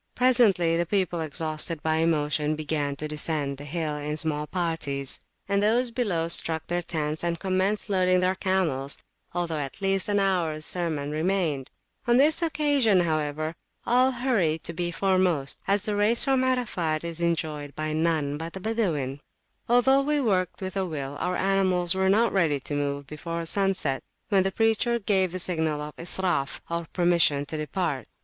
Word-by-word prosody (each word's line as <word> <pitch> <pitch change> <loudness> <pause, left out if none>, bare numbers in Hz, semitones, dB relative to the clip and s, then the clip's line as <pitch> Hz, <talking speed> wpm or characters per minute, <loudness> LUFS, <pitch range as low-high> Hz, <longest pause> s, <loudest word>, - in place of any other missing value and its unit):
Presently 210 -10 +4
the 170 - +1
people, 180 -3 0
exhausted 155 +1 -2
by 160 0 +1
emotion, 155 -2 +1
began 150 -2 -2
to 155 +2 -4
descend 150 -2 -2
the 145 - -8
hill 155 -1 -3
in 150 +1 -3
small 150 -1 -1
parties; 150 -6 -2 0.3
and 200 0 +1
those 235 +4 +2
below 200 -9 0
struck 160 -1 +1
their 175 0 -1
tents 155 -2 -3
and 170 -1 -1
commenced 190 +2 0
loading 185 -2 +3
their 185 +1 +2
camels, 175 -8 -1 0.3
although 170 -3 -2
at 140 +3 -5
least 195 0 0
an 205 0 +2
hours 170 -6 0
sermon 155 -5 -2
remained. 155 -4 -1 0.4
On 240 0 +5
this 300 +5 +4
occassion, 290 - +2
[p.199] 180 - +4
however, 155 0 -1 0.3
all 250 +2 +4
hurry 235 -11 +1
to 170 - -4
be 175 +1 -2
foremost, 180 -5 +1
as 200 0 +2
the 210 -1 -1
race 215 +5 +3
from 265 -2 +2
Arafat 200 -12 0
is 170 0 -5
enjoyed 155 -4 -2
by 155 0 -2
none 155 -3 0
but 165 +1 -5
the 190 - -6
Badawin. 170 - -1 0.5
Although 265 +3 +5
we 295 +1 +1
worked 190 - 0
with 190 +1 -4
a 195 - 0
will, 140 -4 -5
our 180 0 -1
animals 185 -2 +2
were 190 0 +1
not 225 +4 +3
ready 165 -7 +2
to 145 - -5
move 140 0 -2
before 165 +3 -5
sunset, 190 -7 +1 0.3
when 195 -3 +4
the 195 +1 0
preacher 225 +3 +2
gave 195 -4 +1
the 185 - -4
signal 160 -4 -1
of 150 0 -6
Israf, 175 -5 -1
or 170 -1 -2
permission 170 -5 +3
to 155 - -5
depart. 155 -2 -2
170 Hz, 170 wpm, -26 LUFS, 155-195 Hz, 0.5 s, On